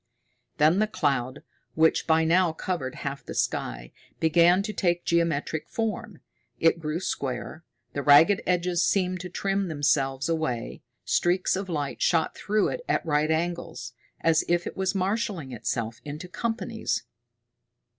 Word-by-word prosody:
Then 155 +5 +4
the 215 - +3
cloud, 140 - -1 0.3
which 160 0 +3
by 160 0 +4
now 170 +1 +3
covered 160 -7 -3
half 140 0 -4
the - - -8
sky, - - -2 0.3
began 170 +4 +4
to 215 +1 -4
take 175 -3 0
geometric 165 -2 0
form. 220 -3 -3 0.4
It 165 +1 +3
grew 155 +1 -2
square, 150 -1 -4 0.3
the 140 - -2
ragged 150 +8 +6
edges 180 -1 +1
seemed 185 -2 +1
to 180 +1 -6
trim 195 +2 -1
themselves 135 -3 +1
away, 155 -8 -2 0.2
streaks 180 +2 +2
of 190 0 -4
light 145 -4 -3
shot 165 -2 +2
through 210 0 +1
it - - -4
at - - +1
right 150 -1 +1
angles, 160 -6 -2 0.3
as 160 -1 +3
if 175 0 +1
it - - -5
was 190 +1 -1
marshaling 190 - -1
itself 115 -1 -3
into 150 +4 -7
companies. 225 - -2
165 Hz, 145 wpm, -26 LUFS, 145-185 Hz, 0.4 s, ragged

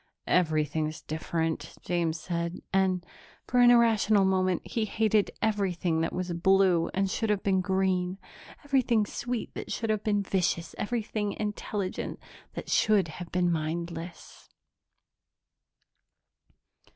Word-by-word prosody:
"Everything's 155 -2 0
different," 160 +1 -3
James 170 -2 -1
said 170 +1 -3
and, 185 -2 +2 0.4
for 250 - +1
an 245 0 +8
irrational 220 -4 +4
moment, 185 -1 +1
he 225 -2 -1
hated 215 0 +2
everything 185 -6 0
that 165 - 0
was 180 -1 -3
blue 185 -1 +3
that 195 +1 +2
should 220 +3 -2
have 205 -2 +1
been 190 -2 +2
green, 190 -1 0 0.5
everything 255 -6 +2
sweet 245 +3 -4
that - - -6
should 225 -2 -1
have 215 -1 -1
been 205 -2 +1
vicious, 180 -3 -1
everything 210 -2 -2
intelligent 210 -2 -3 0.4
that - - -6
should 205 -6 +3
have 170 +2 -8
been 180 -1 +2
mindless. 165 +1 -5
190 Hz, 120 wpm, -28 LUFS, 170-210 Hz, 0.5 s, an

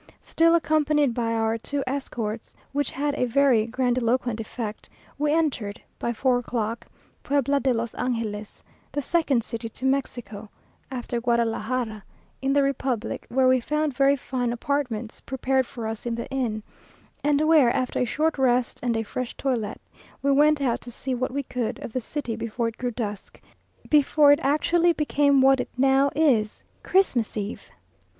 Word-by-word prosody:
Still 330 +1 +3
accompanied 300 -4 +2
by 230 -1 -1
our 225 0 0
two 280 +4 -3
escorts, 235 -5 -4 0.2
which 285 +1 -1
had 290 +1 -1
a 265 - 0
very 245 -3 +3
grandiloquent 245 -1 0
effect, 220 -1 -6 0.3
we 295 0 +2
entered, 265 -10 0 0.2
by 235 - -1
four 245 +1 +2
o'clock, 230 -2 -3 0.3
Puebla 280 0 +1
de 270 -1 +1
los 230 -1 -2
Angeles, 225 -4 -3 0.3
the 290 - -2
second 285 -7 +1
city 230 +1 -5
to 255 - -7
Mexico 245 -6 -2 0.4
(after 245 -2 -4
Guadalajara) 235 -1 -1 0.4
in 270 0 +1
the 285 0 +4
republic, 260 -4 -2
where 260 +1 +3
we 255 0 +5
found 300 +3 -1
very 275 +1 +4
fine 250 -2 -2
apartments 240 -3 -3
prepared 265 0 0
for 235 -2 -7
us 220 +2 -4
in 235 - -1
the 235 - -5
inn, 235 -5 -2 0.6
and 290 0 +3
where, 310 -5 +5
after 255 +1 -1
a 250 - +2
short 305 +5 0
rest 250 -2 +2
and 240 -2 0
a 225 - -1
fresh 250 +3 -5
toilet, 235 -6 -2 0.4
we 280 - +3
went 295 +2 +4
out 245 -4 0
to 245 - -9
see 255 +2 -4
what 255 +1 -1
we 280 +2 -2
could 250 -3 -3
of 220 - -8
the 255 - -1
city 245 -2 -4
before 230 +1 -2
it 230 - -6
grew 245 - -1
dusk, 215 -4 -6 0.5
before 295 0 +5
it 290 - +5
actually 335 +4 +3
became 290 -3 +3
what 270 0 +5
it - - -3
now 270 +1 +4
is, 245 -9 +2 0.2
CHRISTMAS 260 - +2
EVE! 205 +1 -5
255 Hz, 165 wpm, -25 LUFS, 230-280 Hz, 0.6 s, we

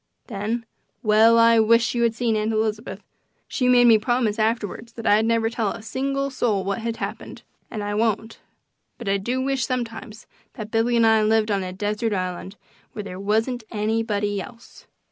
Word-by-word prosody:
Then 225 +2 -3 0.4
well, 220 +1 +5
I 230 0 +6
wish 230 +2 +3
you 240 - -1
had 230 -1 +2
seen 235 -2 0
Aunt 215 +1 0
Elizabeth! 220 0 -2 0.4
She 250 -2 0
made 245 -1 +6
me 225 -2 +6
promise 230 -1 0
afterwards 225 +1 -2
that 230 - -9
I'd 215 +1 +4
never 230 -1 +2
tell 225 -2 -1
a 220 - -10
single 275 +3 -2
soul 220 -7 0
what 200 +3 -2
happened, 230 0 -5 0.3
and 215 -3 -5
I 205 0 -3
won't. 220 +1 -1 0.6
But 235 - -9
I 195 0 +2
do 240 +6 -2
wish 265 -2 -1
sometimes 230 -2 -5 0.3
that 215 -1 -8
Billy 230 +1 +1
and 230 - +4
I 220 -1 +4
lived 215 0 +2
on 200 -1 +1
a 185 - -5
desert 210 +3 -2
island, 185 +1 -4 0.4
where 210 - -5
there 185 -2 -8
wasn't 225 +4 0
anybody 210 -2 -1
else. 235 +4 -13
225 Hz, 180 wpm, -23 LUFS, 210-235 Hz, 0.6 s, I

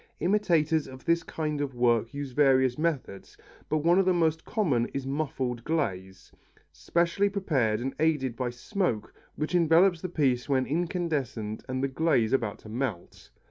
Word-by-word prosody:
Imitators 170 -6 +2
of 130 -1 -12
this 170 0 +2
kind 150 -3 -3
of 135 -3 -3
work 120 -2 +2
use 140 -1 -5
various 130 -2 +3
methods, 150 - -3 0.3
but 155 -1 0
one 175 +2 +5
of 195 - +3
the 185 - +4
most 160 -1 +1
common 150 - 0
is 135 -1 -3
muffled 135 -4 -3
glaze, 95 - -3 0.4
specially 170 - 0
prepared 140 - 0
and 130 +2 -3
aided 150 -6 +1
by 125 -1 -2
smoke 120 - -2 0.2
which 155 +3 -3
envelopes 170 +1 +4
the 185 - -4
piece 135 -6 0
when 130 -2 +2
incandescent 150 - -2
and 130 +1 -2
the - - +2
glaze 130 -5 +1
about 115 -6 0
to - - -15
melt. 115 -5 -5
140 Hz, 160 wpm, -28 LUFS, 120-165 Hz, 0.4 s, one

